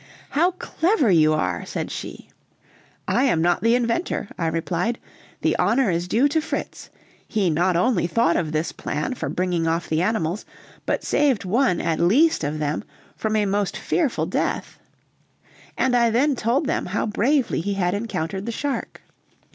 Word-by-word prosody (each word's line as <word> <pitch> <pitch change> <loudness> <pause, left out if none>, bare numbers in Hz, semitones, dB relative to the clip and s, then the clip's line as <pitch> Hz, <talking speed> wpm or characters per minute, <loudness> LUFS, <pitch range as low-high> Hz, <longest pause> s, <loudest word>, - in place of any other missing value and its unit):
"How 330 +6 +3
clever 335 - +1
you 155 -3 +5
are!" 155 - -1
said - - -4
she. - - -7 0.8
"I - - +2
am 205 -12 +2
not 175 +2 +2
the 230 +2 +4
inventor," 235 - -1
I 165 - -1
replied; 170 +7 -1 0.4
"the - - +2
honor 240 -4 +2
is 170 +1 -1
due 240 +9 +3
to 315 +2 +1
Fritz. 315 - -5 0.4
He 200 -6 +1
not 175 +3 +2
only 180 -1 +2
thought 180 0 +2
of 160 -3 -1
this 155 +1 -1
plan 150 - -3
for - - -4
bringing 175 -2 -1
off 165 +1 0
the 160 +1 0
animals, 190 -2 -1 0.4
but - - 0
saved 270 -9 +1
one, 215 -1 +2
at 160 -1 -1
least, 260 - +3
of 150 +1 -2
them 150 0 -2 0.3
from 220 0 -1
a 210 -1 +2
most 200 0 -1
fearful 305 -8 0
death." - - -2 1.0
And 260 -1 +2
I 235 -1 +4
then 265 +5 +2
told 245 +6 0
them 300 - -1
how 195 +4 -1
bravely 235 - +1
he 200 +3 -2
had 180 -2 0
encountered 195 -2 -3
the - - -1
shark. 280 +4 -4
205 Hz, 170 wpm, -23 LUFS, 170-250 Hz, 1.0 s, you